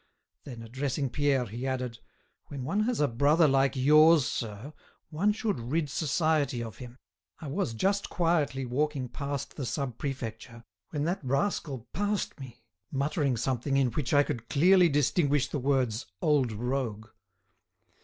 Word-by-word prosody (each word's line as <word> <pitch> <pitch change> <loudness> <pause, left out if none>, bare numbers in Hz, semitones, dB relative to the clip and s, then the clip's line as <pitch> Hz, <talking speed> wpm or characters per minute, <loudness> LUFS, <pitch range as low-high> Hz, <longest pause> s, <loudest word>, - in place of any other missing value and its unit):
Then, 120 -4 -8
addressing 135 +3 -2
Pierre, 140 -3 +1
he 120 +5 -5
added: 125 -3 -3 0.5
"When 140 -3 -6
one 200 +10 0
has 245 -1 -1
a 145 - +3
brother 145 +7 +3
like 135 0 +2
yours, 150 +2 +6
sir, 115 +4 -5 0.4
one 185 +7 +2
should 210 - -2
rid 145 +5 -2
society 150 -5 0
of 115 -2 -9
him. 125 -1 -10 0.4
I - - -9
was 140 - -2
just 195 - 0
quietly 155 -6 0
walking 135 +1 -1
past 140 +1 -5
the 140 - -3
Sub 135 -5 -3
Prefecture, 115 -4 -6 0.3
when 145 -1 -2
that 170 +1 -2
rascal 135 - -1
passed 205 -4 -2
me 120 -4 -11 0.3
muttering 140 -1 0
something 130 +3 -1
in 130 -3 +2
which 135 +2 -2
I 145 -1 +5
could 120 -6 -5
clearly 180 +3 +5
distinguish 145 0 +2
the 145 - -3
words 130 -4 0
'old 145 -6 +2
rogue. 115 -1 -3
140 Hz, 150 wpm, -29 LUFS, 125-150 Hz, 0.5 s, yours